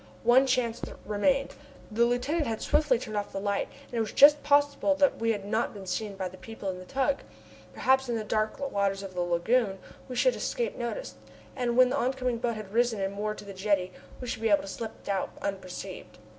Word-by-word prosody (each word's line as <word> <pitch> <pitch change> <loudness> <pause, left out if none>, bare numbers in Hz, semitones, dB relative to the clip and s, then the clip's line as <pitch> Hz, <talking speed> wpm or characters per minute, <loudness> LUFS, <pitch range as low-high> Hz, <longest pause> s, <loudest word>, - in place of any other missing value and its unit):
One 250 +3 +6
chance 245 -3 0 0.2
remained. 270 +7 +1 0.4
The 235 +2 +3
lieutenant 280 +6 0
had 225 -1 -2
swiftly 295 -4 +3
turned 215 -2 -6
off 205 -1 -2
the 195 - -3
light, 200 0 -1 0.2
and - - -22
it 235 - 0
was 220 -1 -1
just 290 +1 +7
possible 285 0 +3
that 285 -1 +3
we 230 0 +2
had 205 -3 -3
not 220 +2 -1
been 195 -2 -8
seen 200 +2 -3
by 190 -1 -3
the 185 +1 -12
people 225 -4 -5
in 180 - -8
the 185 - -10
tug. 275 +4 +1 0.5
Perhaps, 265 - +2
in 235 - 0
the 220 - -2
dark 215 +1 0
waters 200 -1 0
of 195 -1 -7
the 180 - -2
lagoon, 190 +5 +1 0.3
we 250 - -5
should - - +3
escape 475 -1 -2
notice, 245 - -4 0.4
and 245 -2 -1
when 255 -1 +7
the 275 - 0
oncoming 255 -2 0
boat 235 -1 -1
had 210 -2 -8
risen 235 -2 +2
and 195 0 -1
moored 210 +1 -3
to - - -10
the 200 - -8
jetty, 190 -1 0 0.3
we 250 - -6
should 230 - -4
be 225 - +2
able 200 - +4
to - - -8
slip 225 +3 -7
out 195 -1 -1
unperceived. 185 - -6
225 Hz, 220 wpm, -28 LUFS, 200-255 Hz, 0.5 s, just